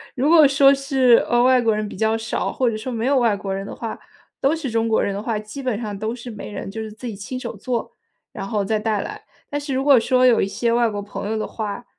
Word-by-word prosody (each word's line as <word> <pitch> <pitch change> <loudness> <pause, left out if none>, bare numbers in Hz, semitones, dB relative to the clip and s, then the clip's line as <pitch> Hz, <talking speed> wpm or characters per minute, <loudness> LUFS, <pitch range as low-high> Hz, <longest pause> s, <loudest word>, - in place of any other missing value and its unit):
如 270 +4 +1
果 315 -4 +7
说 275 0 +5
是， 270 -3 +4
呃， 240 0 +3
外 255 -1 +5
国 225 -2 +2
人 215 0 -2
比 - - -9
较 220 +1 +1
少， 225 +1 -2
或 255 -2 +1
者 220 - -3
说 240 +4 -5
没 230 0 -2
有 275 0 +3
外 230 -4 +2
国 195 -1 -4
人 195 0 -4
的 - - -7
话， 225 -2 -6 0.4
都 280 +4 +2
是 290 -6 -4
中 225 0 +1
国 220 - +2
人 200 - -1
的 200 - -4
话， 225 -1 -2
基 215 +6 -7
本 245 -5 -2
上 205 -3 -4
都 220 +2 -3
是 245 -1 -8
没 210 - -8
人 205 - -6
就 220 +2 -5
是 220 -1 -6
自 220 +4 -11
己 225 - -4
亲 205 +6 -6
手 235 -3 -6
做， 235 +3 -3 0.4
然 195 - -6
后 210 -2 -1
再 215 +2 0
带 215 -1 0
来。 425 0 -7 0.3
但 290 - -2
是 285 -2 -4
如 265 - 0
果 275 -4 +6
说 255 +2 +3
有 245 -2 +5
一 195 - +1
些 225 +4 -1
外 235 0 +3
国 205 -1 -4
朋 200 0 -6
友 220 - -1
的 215 - -2
话， 215 +1 -5
230 Hz, 305 characters per minute, -21 LUFS, 215-255 Hz, 0.4 s, 果